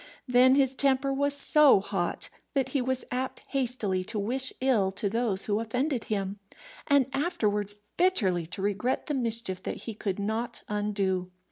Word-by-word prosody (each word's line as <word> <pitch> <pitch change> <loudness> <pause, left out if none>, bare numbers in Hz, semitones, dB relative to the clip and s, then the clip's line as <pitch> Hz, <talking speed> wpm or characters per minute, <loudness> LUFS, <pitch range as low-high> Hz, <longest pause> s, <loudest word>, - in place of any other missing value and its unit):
Then 255 +1 +5
his 270 -2 +2
temper 275 0 +1
was 285 +1 +1
so 285 -4 +7
hot, 195 -3 -3 0.2
that 270 -3 0
he 275 0 0
was 260 0 -2
apt 255 +1 -4
hastily 235 -8 -1
to 215 - -5
wish 255 +6 +2
ill 230 -8 +2
to 205 - -2
those 225 -4 +2
who 210 0 0
offended 250 +3 -2
him, 200 -1 -3 0.5
and 280 -3 +3
afterwards 210 - -1 0.2
bitterly 195 - +2
to 190 +3 -5
regret 205 +6 -1
the 295 - -3
mischief 230 -7 -1
that - - -6
he 225 - -5
could 200 -3 -4
not 220 +4 -4
undo. 200 -3 -2
230 Hz, 160 wpm, -27 LUFS, 200-265 Hz, 0.5 s, so